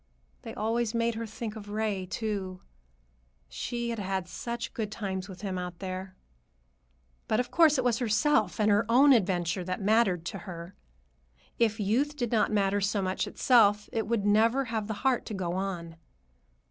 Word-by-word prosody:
They - - -8
always 225 +1 -1
made 230 0 +1
her 225 0 -5
think 220 0 -6
of 205 -2 -9
Ray, 205 -3 -2
too. 195 -3 -4 0.9
She 235 - -3
had 230 - -4
had 190 -2 -2
such 235 +5 -5
good 220 -5 -3
times 195 -3 -4
with 185 -1 -10
him 190 -3 -3
out 180 -1 -6
there. 185 0 -6 1.1
But, 215 - +1
of 250 -1 -2
course, 320 -3 +5
it 255 - +1
was 240 -2 +1
herself 220 - +2
and 210 0 +3
her 205 +2 +4
own 270 +4 +7
adventure 180 -4 +1
that 185 +1 -3
mattered 195 -4 +2
to 195 - -4
her. 170 +1 -8 0.9
If 220 -1 +2
youth 250 +9 +1
did 240 -5 -2
not 220 -2 +2
matter 200 -1 +1
so 200 0 0
much 185 0 -1
to - - -6
itself, 210 -5 +4
it 220 -2 -1
would 225 -3 0
never 225 +6 +3
have 220 -3 -3
the 220 - -3
heart 260 -2 +3
to 215 - -4
go 180 -2 -2
on. 175 -3 -4
210 Hz, 180 wpm, -29 LUFS, 190-230 Hz, 1.1 s, own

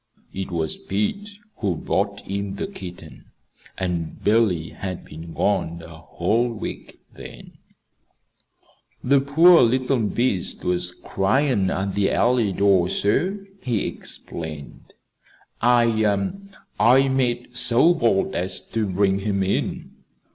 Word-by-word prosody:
It 95 0 -5
was 80 -3 -1
Pete 105 - -3 0.3
who 100 -5 -1
brought 100 +5 -2
in 100 0 -4
the - - -3
kitten; 90 - -10 0.5
and 85 -3 -3
Billy 100 -7 +2
had 95 -2 -6
been 80 +2 -10
gone 85 -3 -1
a 85 -1 -11
whole 110 +8 0
week 115 - -7
then. - - -12 1.4
"The 140 +2 +4
poor 165 +6 +6
little 130 +2 +2
beast 110 -3 -1
was 90 0 +1
cryin' 100 +3 0
at 95 +1 -2
the 100 -1 +1
alleyway 120 -4 +2
door, 95 -3 +3
sir," 185 - 0 0.2
he 120 -5 -1
explained. 75 -4 -7 0.7
"I 110 -5 +2 0.5
I 130 +5 +5
made 125 -2 -1
so 125 +7 +5
bold 115 - +1
as 95 +2 0
to 110 -2 -1
bring 95 +1 +1
him 100 -1 -1
in." 95 - -2
100 Hz, 120 wpm, -23 LUFS, 95-120 Hz, 1.4 s, poor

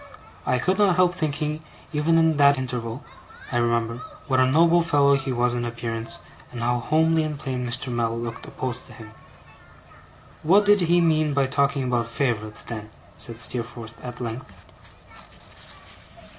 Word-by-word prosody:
I 125 - +2
could 185 +10 0
not 200 -4 +4
help 180 -1 +4
thinking 150 -2 -2 0.3
even 155 +2 +2
in 160 -2 +3
that 140 -1 +6
interval, 125 -1 -4 0.5
I 120 - 0
remember, 115 0 0 0.2
what 130 -4 +1
a 130 - +5
noble 165 +5 +5
fellow 145 -4 +3
he 135 -1 0
was 120 0 +1
in 120 0 -2
appearance, 115 -1 -4 0.3
and 120 - -6
how 120 +1 +1
homely 160 +5 +2
and 155 -1 -3
plain 130 -3 -3
Mr. 125 +1 -1
Mell 115 -1 0
looked 115 -1 -6
opposed 125 -1 -5
to - - -13
him. 110 -1 -12 1.3
'What 195 +6 +4
did 205 -1 +5
he 175 +1 +3
mean 155 -3 +2
by 140 -1 +3
talking 140 0 +1
about 120 -2 0
favourites, 115 -4 -1
then?' 110 -2 -7 0.3
said 115 -1 -5
Steerforth 115 -2 -5
at 125 -1 -7
length. 115 -2 -5
130 Hz, 155 wpm, -24 LUFS, 120-155 Hz, 1.3 s, that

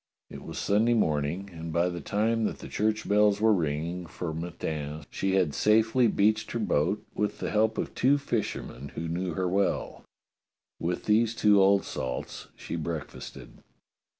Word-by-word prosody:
It - - -8
was - - -8
Sunday 110 +4 +2
morning, 80 0 0
and 80 0 -6
by 85 +2 +2
the 85 -1 -4
time 110 +2 0
that - - -2
the - - -9
church 110 +1 -1
bells 105 0 +4
were 110 0 +5
ring 80 -4 0
ing 90 +1 -5
for 80 0 -5
matins 80 -3 -5
she 95 0 0
had 90 -6 +2
safely 110 - +3
beached 110 +1 +1
her 115 - -1
boat 95 -1 0
with 105 0 -1
the - - -3
help 110 +1 +2
of - - -3
two 135 +3 +3
fishermen 105 - -4
who 85 - -3
knew 85 0 -2
her 95 -1 0
well. 100 +2 -1 0.8
With 85 +2 -2
these 110 +2 +3
two 105 -3 +5
old 100 +1 +4
salts 65 -1 -5
she - - -6
breakfasted. 80 -2 -6
95 Hz, 170 wpm, -28 LUFS, 80-110 Hz, 0.8 s, were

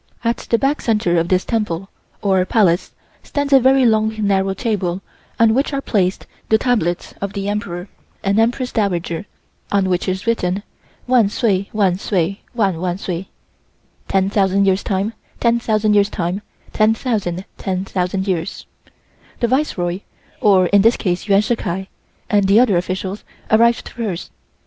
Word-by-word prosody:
At 230 0 +1
the 230 - +4
back 275 +4 0
centre 210 -7 +1
of 165 - 0
this 185 0 +1
Temple, 195 -6 -2 0.4
or 190 -2 +3
Palace, 185 -3 +2 0.3
stands 285 -1 -2
a 270 - +8
very 265 +1 +4
long 220 -1 +2
narrow 195 -1 +1
table 195 -5 -2 0.4
on 225 -1 +5
which 275 +4 0
are 275 - 0
placed 195 -8 0 0.2
the 220 - +5
tablets 215 -8 -1
of 200 0 -3
the 200 0 -3
Emperor 200 -3 -3 0.4
and 200 +2 +2
Empress 245 +3 +1
Dowager, 180 -4 -1 0.4
on 200 -2 +2
which 180 0 0
is 190 +1 -2
written, 200 -4 0 0.4
"Wan 245 -5 +4
sway, 200 -3 0
wan 195 -4 +1
sway, 195 -1 -1
wan 195 -7 +1
wan 180 -1 -1
sway" 185 -1 -5 0.8
(10,000 195 0 +2
years 190 0 +2
times 200 +3 -1 0.3
10,000 220 -3 +2
years 205 0 +4
times 180 +1 -2 0.3
10,000 215 -5 0
10,000 190 0 -2
years). 185 -1 -2 0.7
The 235 - +2
Viceroy, 195 -10 0 0.4
or 195 -3 +5
in 200 +3 +4
this 225 +3 +4
case 180 0 -2
Yuan 200 0 +5
Shih 230 +2 0
Kai, 190 -1 -4 0.4
and 205 -2 +2
the 200 +3 +6
other 240 -6 +4
officials 185 +3 -2 0.3
arrived 235 +2 +4
first. 215 -8 -5
200 Hz, 150 wpm, -19 LUFS, 185-225 Hz, 0.8 s, a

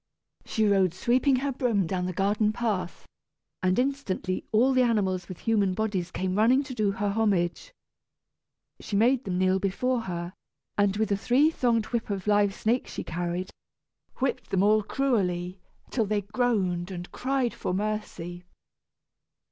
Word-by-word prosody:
She 220 - 0
rode 190 -4 +3
sweeping 255 +6 +2
her 275 +2 -1
broom 235 -7 +1
down 180 +1 -2
the - - -2
garden 205 +3 +1
path, 210 -6 -3 0.6
and 185 0 +2
instantly 250 -9 -1
all 245 +5 +4
the 255 - +4
animals 195 -7 +1
with 185 - -7
human 205 -5 +1
bodies 200 -5 -1
came 185 0 -2
running 250 +6 +4
to 270 -2 -7
do 215 -4 +1
her 205 -1 -1
homage. 200 - 0 1.1
She 205 - -5
made 245 +5 +3
them 180 -2 -2
kneel 185 +1 +2
before 235 +6 0
her, 175 -3 -5 0.4
and, 205 -1 +2
with 220 -1 0
the 200 - +1
three 260 +9 +3
thonged 235 -7 +1
whip 230 -2 -1
of 195 -2 -3
live 205 -1 +3
snakes 235 +3 -1
she - - -4
carried, 175 +2 -3 0.6
whipped 265 0 -2
them 190 0 +2
all 215 +1 +4
cruelly, 190 -7 -1 0.3
till 225 -5 0
they 210 0 0
groaned 200 -5 0
and 175 -2 -7
cried 260 -2 -1
for - - -3
mercy. 185 -3 -3
205 Hz, 155 wpm, -27 LUFS, 185-240 Hz, 1.1 s, all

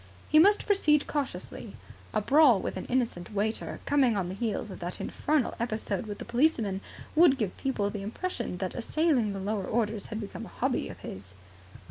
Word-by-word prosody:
He 310 - +6
must 405 +5 +5
proceed 305 -8 +3
cautiously. 285 -3 -4 0.4
A 215 - +1
brawl 270 -2 +6
with - - -4
an - - -5
innocent 230 -7 -1
waiter, 215 +2 -1
coming 265 -6 +3
on 180 -3 -1
the - - -4
heels 215 0 -2
of - - -8
that 175 +1 -4
infernal 300 -4 0
episode 220 -3 -2
with 205 -1 -5
the - - -7
policeman, 235 -6 +1 0.3
would 315 -4 +6
give 210 -7 -2
people 205 -7 -1
the 205 - -5
impression 235 - -4
that 185 0 -3
assailing 255 -3 +1
the 195 - -4
lower 200 0 -2
orders 220 -2 -1
had 220 - -4
become 205 -3 -6
a - - -16
hobby - - 0
of - - -9
his. 95 0 -9
225 Hz, 185 wpm, -29 LUFS, 200-280 Hz, 0.4 s, He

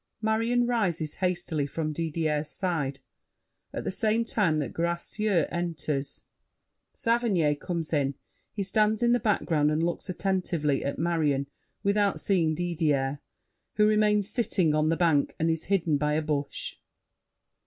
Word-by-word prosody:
[Marion 230 +3 +1
rises 180 -11 0
hastily 175 -5 0
from 155 +1 -3
Didier's 155 -1 -1
side. 150 -8 -2 0.7
At - - -4
the - - -2
same 220 +3 +1
time 190 -9 +1
that 145 -6 -2
Gracieux 170 +2 0
enters, 155 -5 -3 0.7
Saverny 225 -10 +2
comes 165 +2 -4
in; 140 -2 +1 0.4
he 200 - -3
stands 215 +3 +1
in 240 - +4
the 245 - +4
background 165 -8 +1
and 155 +2 +1
looks 175 +3 -2
attentively 180 -7 0
at 140 - -2
Marion 155 -5 +1 0.4
without 200 0 +2
seeing 165 -5 +2
Didier, 150 -5 0 0.6
who 210 - +4
remains 210 -1 +3
sitting 205 -8 +1
on 155 +1 +2
the 165 - +1
bank 160 -5 +2
and 165 +1 +1
is 160 -1 -3
hidden 170 -6 +1
by 150 0 +1
a 155 - 0
bush. 145 -2 -3
170 Hz, 140 wpm, -27 LUFS, 150-205 Hz, 0.7 s, in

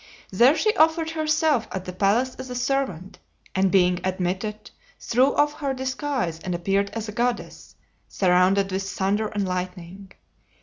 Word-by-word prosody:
There 240 +10 +5
she 430 0 +1
offered 320 0 +3
herself 310 -6 +1
at 190 -1 -5
the 180 - -6
palace 220 +7 +1
as 260 0 -7
a 250 - -5
servant, 245 -9 -2 0.3
and 190 0 +2
being 180 -2 +3
admitted, 190 +3 -3 0.3
threw 255 +4 +2
off 295 0 +2
her 275 -3 -2
disguise 260 - -2
and 180 +1 -4
appeared 195 +3 0
as 225 -1 -4
a - - -5
goddess, 240 +2 -3 0.3
surrounded 190 +1 +2
with 190 +1 -1
thunder 195 +2 -1
and 205 -2 -2
lightning. 180 +1 -6
205 Hz, 150 wpm, -24 LUFS, 185-260 Hz, 0.3 s, There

